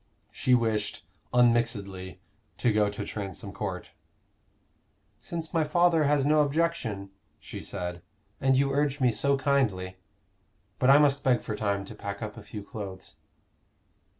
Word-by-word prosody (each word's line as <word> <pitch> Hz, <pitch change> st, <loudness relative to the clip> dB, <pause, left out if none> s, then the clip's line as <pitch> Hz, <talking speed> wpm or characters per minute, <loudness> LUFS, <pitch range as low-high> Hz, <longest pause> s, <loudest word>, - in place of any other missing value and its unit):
She 125 Hz, -, +3 dB
wished, 110 Hz, -3 st, -1 dB, 0.3 s
unmixedly, 105 Hz, -7 st, +1 dB, 0.4 s
to 120 Hz, -3 st, +2 dB
go 105 Hz, -1 st, +3 dB
to 100 Hz, -, -5 dB
Transome 100 Hz, -4 st, -6 dB
Court. -, -, -5 dB, 1.3 s
"Since 165 Hz, -2 st, -6 dB
my 165 Hz, -2 st, +3 dB
father 165 Hz, 0 st, +3 dB
has 145 Hz, -1 st, +3 dB
no 150 Hz, +1 st, +4 dB
objection," 140 Hz, -10 st, -1 dB, 0.3 s
she -, -, -8 dB
said, 90 Hz, -3 st, -5 dB, 0.4 s
"and 135 Hz, -1 st, +3 dB
you 135 Hz, 0 st, +2 dB
urge 145 Hz, 0 st, +1 dB
me 125 Hz, -2 st, +4 dB
so 140 Hz, +6 st, +1 dB
kindly. 115 Hz, -10 st, 0 dB, 0.8 s
But 130 Hz, -, +3 dB
I 140 Hz, -, +9 dB
must 140 Hz, -1 st, +3 dB
beg 125 Hz, -4 st, +3 dB
for 110 Hz, -, -4 dB
time 100 Hz, -2 st, -1 dB
to -, -, -8 dB
pack 100 Hz, +2 st, -6 dB
up 105 Hz, -1 st, -5 dB
a 115 Hz, -, -9 dB
few 105 Hz, 0 st, -8 dB
clothes." 100 Hz, -3 st, -8 dB
120 Hz, 145 wpm, -28 LUFS, 100-140 Hz, 1.3 s, I